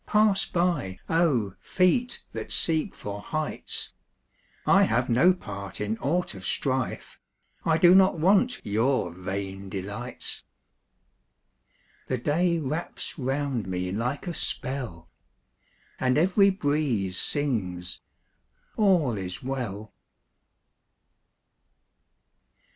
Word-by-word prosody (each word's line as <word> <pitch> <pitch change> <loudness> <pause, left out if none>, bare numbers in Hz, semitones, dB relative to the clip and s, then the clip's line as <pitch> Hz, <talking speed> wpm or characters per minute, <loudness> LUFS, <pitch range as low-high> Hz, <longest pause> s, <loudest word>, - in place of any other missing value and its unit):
Pass 210 -2 +4
by, 170 - 0
oh, 140 - +2
feet 220 +7 +1
that - - -5
seek 160 +3 +1
for 100 0 -6
heights! 155 +6 -3 0.7
I - - +6
have 120 +3 +2
no 130 +10 +5
part 100 - -6
in 105 +2 -2
aught 175 +2 0
of 95 -2 -10
strife; 130 +4 -2 0.5
I 160 -1 +3
do 175 +1 +7
not 190 -2 +5
want 205 +9 +3
your 110 -1 +1
vain 95 +2 -5
delights. 100 +6 -5 1.6
The 130 - 0
day 170 +7 +1
wraps 155 +2 -4
round 135 -3 -1
me 90 0 -2
like 120 - -2
a 175 - -3
spell, 120 - -2 0.9
And 130 0 +2
every 190 +5 +5
breeze 145 - 0
sings, 90 - -1 0.8
"All 180 - +3
is 90 +3 -6
well." 115 -6 -4
130 Hz, 100 wpm, -27 LUFS, 100-170 Hz, 1.6 s, do